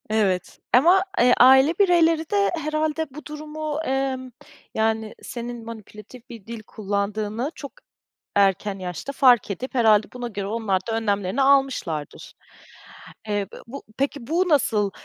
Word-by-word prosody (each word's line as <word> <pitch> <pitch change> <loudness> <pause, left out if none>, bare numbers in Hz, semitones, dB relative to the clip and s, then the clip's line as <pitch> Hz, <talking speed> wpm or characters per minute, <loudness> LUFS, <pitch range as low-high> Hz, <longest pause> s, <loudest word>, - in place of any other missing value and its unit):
Evet 200 -4 0
ama, 345 +9 +5 0.2
eee, 245 0 +6
aile 265 +5 +7
bireyleri 335 -4 +3
de 405 -1 +2
herhâlde 310 0 -1
bu 300 - -10
durumu, 305 0 -5
emm, 265 -1 -2 0.4
yani, 220 0 -1
senin 240 -1 -7
manipülatif 230 +2 -12
bir 230 -5 -11
dil 230 -1 -7
kullandığını 210 +4 -3
çok 280 - -9 0.6
erken 195 0 +1
yaşta 180 - -5
fark 245 -7 +4
edip 255 +8 -6
herhâlde 220 -3 +4
buna 245 -1 -5
göre 200 -3 -5
onlar 210 -3 0
da 225 -1 -1
önlemlerini 205 +1 -1
almışlardır. 265 - 0 1.0
Eee, 205 -1 -1 0.2
bu 275 +4 -8
peki, 275 -2 -2
bu 350 +4 +1
nasıl, 225 -9 +2
240 Hz, 130 wpm, -23 LUFS, 210-285 Hz, 1.0 s, aile